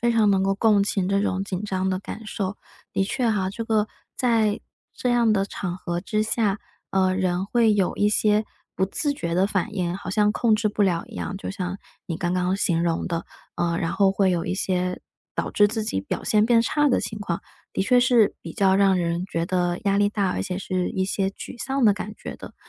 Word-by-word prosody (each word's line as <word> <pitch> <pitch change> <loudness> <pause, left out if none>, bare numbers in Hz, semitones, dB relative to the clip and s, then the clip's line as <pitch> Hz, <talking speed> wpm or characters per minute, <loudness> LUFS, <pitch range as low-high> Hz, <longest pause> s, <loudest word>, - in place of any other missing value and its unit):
非 240 0 +2
常 220 -3 +4
能 190 -1 +3
够 195 0 +2
共 210 -1 +4
情 195 -2 0
这 200 0 +2
种 190 -1 -1
紧 195 0 -4
张 190 -1 -1
的 185 - 0
感 215 +2 -8
受。 200 -2 -3 0.4
的 195 - +2
确 245 +5 -2
啊， 195 -4 +1
这 225 +3 -5
个 215 -2 +2 0.3
在 225 -4 +2 0.3
这 250 - -1
样 235 -2 +3
的 195 -2 +2
场 185 -2 -4
合 175 -1 -3
之 215 +3 0
下， 215 -2 0 0.3
呃， 185 -1 +2
人 185 -1 0
会 225 0 +3
有 195 -3 +1
一 205 - +3
些 210 0 +2 0.3
不 190 - +1
自 290 - -1
觉 170 -11 -3
的 190 +2 +3
反 205 +1 -2
应， 175 -3 -1
好 190 -1 -7
像 210 +1 +2
控 225 -2 +3
制 215 -1 +1
不 210 - -5
了 175 -2 +1
一 230 - -13
样， 200 - -4
就 - - -5
像 190 0 -4 0.3
你 165 - -3
刚 175 +1 -1
刚 185 +1 +1
形 170 -4 +1
容 165 -1 0
的， 170 -2 -3 0.3
呃， 170 -1 0
然 165 - -1
后 195 -1 +4
会 195 -1 +2
有 170 -2 -1
一 185 - -1
些 180 -1 -1 0.3
导 - - -2
致 205 0 +4
自 220 0 -2
己 95 - -1
表 95 - -4
现 215 0 +3
变 230 -1 +5
差 295 +4 +2
的 250 - +3
情 215 - -4
况， 175 -4 -3 0.3
的 - - +1
确 250 +4 +4
是 245 -4 +4
比 - - -8
较 195 -3 +3
让 195 -1 +4
人 170 +1 -1
觉 165 -3 -2
得 175 0 0
压 200 0 +2
力 205 0 +4
大， 200 -3 0
而 - - -2
且 180 - -3
是 185 -1 -1
一 190 - -1
些 195 0 0
沮 215 +4 -8
丧 270 -1 0
的 210 - +7
感 210 +1 -6
觉 - - -7
的。 - - -11
195 Hz, 250 characters per minute, -24 LUFS, 185-215 Hz, 0.4 s, 的